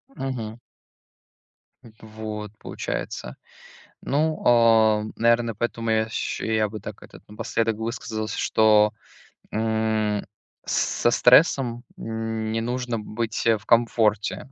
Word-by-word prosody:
Мгм. 120 -4 -5 1.2
В 115 - -14 0.2
вот 105 -1 -6
получается. - - -5 0.7
Ну, 155 +3 0
а, 110 -3 +5
наверное, 115 0 +2
поэтому 115 +1 -2
я 110 0 +2
ща 110 - -3
я 110 -1 +1
бы 110 +1 -8
так, 105 0 -9
этот, - - -14
напоследок 110 +1 -1
высказался, 110 -1 -4
что, 105 -1 +4 0.6
м, 110 -1 0 0.4
с - - -3 0.3
со 120 - +4
стрессом 125 -2 +4
не 110 0 -3
нужно 120 0 -2
быть, 110 +2 -4
э, 115 -1 +5
в 105 - -13
комфорте. 115 -1 +1
110 Hz, 110 wpm, -24 LUFS, 110-115 Hz, 1.2 s, а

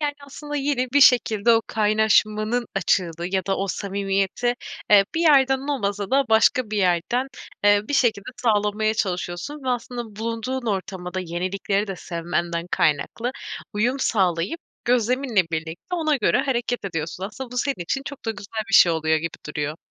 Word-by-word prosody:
Yani 295 -1 -1
aslında 295 +1 -7
yine 275 -3 0
bir 285 - +4
şekilde 235 -4 +5
o 225 0 +3
kaynaşmanın 215 +2 +2
açığını 175 -3 0
ya 190 -1 0
da 195 - 0
o 195 - -1
samimiyeti, 195 +4 -1 0.4
eee, 200 -1 +7
bir 330 - 0
yerden 270 -3 +4
olmasa 205 -6 -2
da 275 +1 +3
başka 220 +1 +3
bir 215 - -2
yerden, 185 +8 +1 0.4
eee, 205 0 +5
bir 290 - -1
şekilde 225 -5 +1
sağlamaya 215 -1 +1
çalışıyorsun 185 - -3
ve 260 - -2
aslında 240 -3 -4
bulunduğun 230 +3 -3
ortama 190 -3 -3
da 185 - -1
yenilikleri 185 +4 -2
de 195 -2 -5
sevmenden 170 0 -3
kaynaklı 170 - 0 0.4
uyum 240 +6 0
sağlayıp 190 - 0 0.2
gözleminle 245 -2 +2
birlikte 160 - -4
ona 310 -4 +1
göre - - +2
hareket 245 -4 -1
ediyorsun. 165 0 -4
Aslında 235 +5 -7
bu 250 - -8
senin 275 -9 -1
için 270 +10 -2
çok 285 -3 -8
da 225 - 0
güzel 215 +1 -5
bir 195 - 0
şey 170 - +7
oluyor 160 0 +1
gibi 165 +1 -5
duruyor. 150 0 -3
215 Hz, 165 wpm, -23 LUFS, 185-250 Hz, 0.4 s, eee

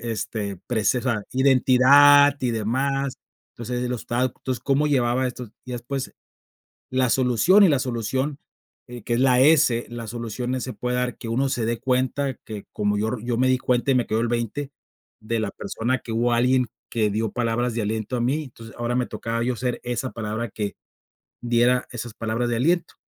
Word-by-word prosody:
este, 110 -3 -4
prece 120 +1 +1
o - - -6
sea, 120 -5 -1
identidad 140 +2 +6
y 125 - 0
demás. 135 +5 -1 0.4
Entonces, 125 +1 -4
el 125 - -2
obsta 120 +1 -2
entonces, 130 -1 -4
cómo 140 +2 +2
llevaba 130 -2 +1
estos. 125 -2 -6 0.2
Y 125 - -6
después 130 +3 -5 0.8
la 130 -1 +2
solución, 130 - +4
y 190 - +6
la 140 -4 +2
solución, 130 +3 -2 0.5
eh, 120 -1 -9
que 120 - -2
es - - 0
la 130 -2 +4
S 140 -5 +4
la 120 -1 -6
solución 120 +3 -4
se 130 - -5
puede 125 0 -2
dar 125 -1 -2
que - - -8
uno 130 +4 +1
se 120 -4 -1
dé 115 0 -1
cuenta 130 +1 0
que 105 -2 -7
como 105 0 0
yo 110 +1 0
ri 120 -2 -5
yo 120 -1 -1
me 130 - +3
di 130 0 +3
cuenta 125 +1 0
y - - +3
me 125 - +2
quedó 110 - 0
el 120 - 0
20 120 +4 -2 0.5
de 115 +1 -2
la 110 -2 -1
persona 120 +6 -2
que 115 - -9
hubo, 120 +2 +1
alguien 125 +1 +2 0.2
que 110 -3 +1
dio 110 +1 -1
palabras 120 0 -1
de 115 - -1
aliento 110 +3 -2
a 120 - -1
mí, 140 +6 0
entonces, 115 -3 -13
ahora 120 +1 -2
me 125 -1 0
tocaba 115 0 -3
yo 125 0 -1
ser 125 +1 -2
esa 125 +1 -3
palabra 110 +1 -4
que 105 -1 -4 0.7
diera 120 +1 +2
esas 120 -2 -6
palabras 115 +2 -2
de 120 - 0
aliento. 170 +8 +1
125 Hz, 200 wpm, -23 LUFS, 115-130 Hz, 0.8 s, identidad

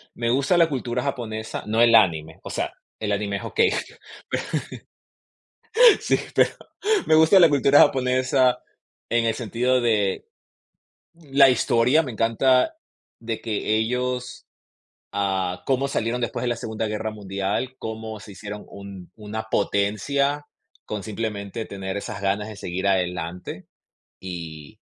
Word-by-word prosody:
me 115 0 0
gusta 140 +7 +2
la 170 - +5
cultura 125 -2 -2
japonesa, 110 -5 -4
no 110 +2 +2
el 115 -1 +5
anime, 80 -7 +3
o - - -8
sea, - - -3 0.3
el 105 -1 -2
anime 100 0 -1
es - - -8
okey, 445 0 +2 2.3
sí, - - +2 0.2
pero - - +4 0.6
me 155 - +5
gusta 160 +5 +6
la 170 - +8
cultura 145 0 +5
japonesa 130 0 +3 0.5
en 120 0 +2
el 115 -1 +1
sentido 125 +3 0
de 105 -5 0 0.9
la 140 -4 +4
historia, 125 +4 +3
me 130 -6 -5
encanta 125 - +2 0.4
de 115 -1 -4
que 110 -1 -1
ellos, 125 +2 -2 0.7
ah, 95 -3 -1
cómo 135 0 +1
salieron 120 -2 -1
después 120 0 -3
de 125 - 0
la 120 - -1
Segunda 110 -2 -3
Guerra 110 +1 -3
Mundial, 100 +5 -3
cómo 110 0 -6
se 100 0 -11
hicieron 105 +1 -8
un 100 -3 -10
una 110 +1 -5
potencia 140 +10 0 0.4
con 105 -1 -4
simplemente 105 0 -4
tener 95 -1 -5
esas 100 - -5
ganas 100 +2 -1
de 105 - -9
seguir 95 0 -3
adelante, 90 -2 -2 0.5
y 80 -5 -8
110 Hz, 135 wpm, -24 LUFS, 100-125 Hz, 2.3 s, la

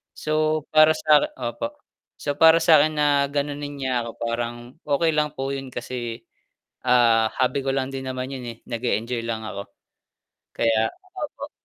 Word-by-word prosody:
So 155 0 0
para 155 0 +7
sa 150 -2 +5
'kin - - -3
opo, 290 - -4 0.4
so 145 - -2
para 160 +1 +7
sa 160 -3 +7
akin 155 +1 +1
na 150 0 +3 0.2
ganonin 145 0 -3
niya 130 -3 0
ako, 115 - -8
parang 115 0 -2 0.3
okey 150 +3 +2
lang 150 -1 +1
po 135 +1 -2
yun 135 -1 -6
kasi, 120 -1 -5 0.6
ah, 115 -3 +4
hobby 130 +2 +2
ko 135 - 0
lang 135 -1 -1
din 135 - -4
naman 130 0 -4
'yon 130 - -6
eh, 115 - -10
nag-eenjoy 115 0 -2
lang 110 -1 -3
ako. 100 -2 -6 0.8
Kaya 110 -1 +2 0.3
opo. 290 -2 -6
130 Hz, 165 wpm, -23 LUFS, 120-150 Hz, 0.8 s, para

